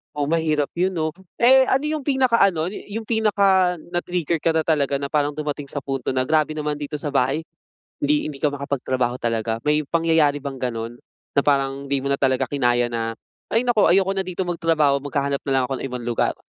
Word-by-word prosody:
Oo, 145 -1 -1
mahirap 155 -3 +1
'yon, 185 +2 +1
'no? 155 -1 0 0.3
Eh, 260 +2 +5
ano 270 +2 +2
yung 300 -1 -2
pinaka-ano 230 - +2
yu - - -6 0.2
yung 220 - -9
pinaka 200 -5 +3 0.2
na 175 - +1
na-trigger 170 -2 -2
ka 165 - +1
na 160 - +2
talaga 145 -3 +1
na 140 0 -3
parang 145 -1 +1
dumating 145 -2 -4
sa 145 0 -5
punto 135 -2 -3
na, 130 - +2
"Grabe 155 +1 +1
naman 150 -1 -2
dito 150 +1 -5
sa 145 0 -3
bahay." 140 +3 +1 0.6
Hindi 295 0 +1
hindi 140 - -9
ka 150 - +3
makapagtrabaho 130 -3 -2
talaga, 115 -1 -1
may 150 0 +2
pangyayari 160 -3 +2
bang 140 -2 -5
gano'n? 120 -2 -4 0.4
Na 140 - +6
parang 140 -1 +1
hindi 140 0 0
mo 140 - -2
na 140 - +1
talaga 130 -1 +1
kinaya 120 -3 +2
na, 115 -1 -2 0.4
"Ay 225 +2 +3
naku, 235 -4 +4
ayoko 195 +1 +3
na 190 - 0
dito 185 +1 -3
magtrabaho, 165 -5 +2
maghahanap 140 0 -1
na 135 - -1
lang 130 -1 +3
ako 135 - -2
ng - - -6
ibang 125 -1 -5
lugar." 120 - 0
150 Hz, 205 wpm, -22 LUFS, 135-175 Hz, 0.6 s, Na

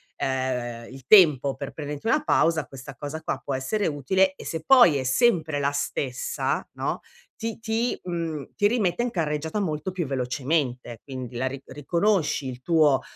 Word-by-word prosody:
ehm, 125 -3 -2
il 130 -1 -12
tempo 150 -9 +6
per 140 0 -6
prenderti 150 +5 -6
una 300 +6 +2
pausa 165 - +2
questa 135 +1 -10
cosa 150 +2 -6
qua - - -3
può 140 - -3
essere 195 +11 -1
utile 185 +6 +2
e - - -11
se 160 -1 -4
poi 240 - +7
è 130 - -2
sempre 155 - +2
la 140 0 +1
stessa, 140 -3 -2
no, - - -3 0.3
ti 225 -1 -5
ti 225 +2 -1
mhmm 165 -5 -4
ti 205 -1 +3
rimette 215 -2 +1
in 245 - -2
carreggiata 160 +2 -2
molto 155 -2 -2
più 180 -2 -3
velocemente, 130 -2 -2
quindi 130 -3 -7
la 130 +2 -1
ri 135 +1 -5
riconosci 160 +2 0
il 125 -1 -7
tuo, 150 -3 +3
150 Hz, 170 wpm, -25 LUFS, 130-180 Hz, 0.3 s, poi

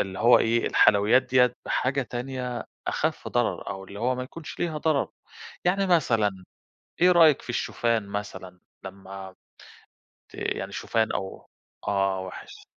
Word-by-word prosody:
اللي 95 -1 -3
هو 120 +1 +6
إيه 115 +1 +1
الحلويّات 110 +5 +5
ديَّة 125 -1 +3
بحاجة 135 +2 0
تانية 125 0 -5 0.2
أخف - - -1
ضرر - - -1
أو 95 -1 -6
اللي 100 +1 -10
هو 125 +2 +1
ما 125 - -4
يكونش 145 +3 -9
ليها 160 -3 -1
ضرر. 155 -2 +1 0.6
يعني 195 +2 +2
مثلًا، 110 - +1 0.6
إيه 180 +1 +6
رأيِك 160 -4 +6
في - - -7
الشوفان 115 -2 -1
مثلًا؟ 95 -3 -6 0.2
لمّا 95 0 -9 1.0
ت - - -13
يعني - - -3
شوفان 110 -1 0
أو 95 -1 -5 0.4
آه 95 -1 +1
وحش 95 -1 -10
120 Hz, 140 wpm, -26 LUFS, 100-135 Hz, 1.0 s, هو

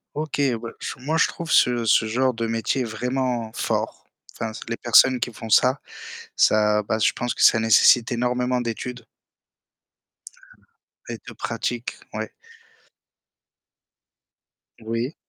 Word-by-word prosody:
OK, 150 -1 -4 0.2
ben 115 0 -8
j - - -5
moi 155 +5 -1
je - - +4
trouve 170 -1 -7
ce 120 -2 +3
ce 110 - +4
genre 125 +3 0
de 115 0 -3
métier 115 +3 -1
vraiment 120 0 -2
fort. - - -3 0.3
Enfin, 110 -1 -5
c'est 115 - -10
les 115 - -3
personnes 125 +1 +5
qui 125 0 -2
font 110 - -9
ça, 130 +5 +4 0.6
ça 105 0 +3
bah 110 - -1
je 105 - +3
pense 120 0 -3
que - - 0
ça 115 - +6
nécessite 110 +2 +5
énormément 125 +1 0
d'études 120 +1 -5 2.0
et - - -5
de - - -8
pratique, - - -4 0.2
ouais. - - -5 2.5
Oui. 115 +5 -3
120 Hz, 135 wpm, -23 LUFS, 115-125 Hz, 2.5 s, ça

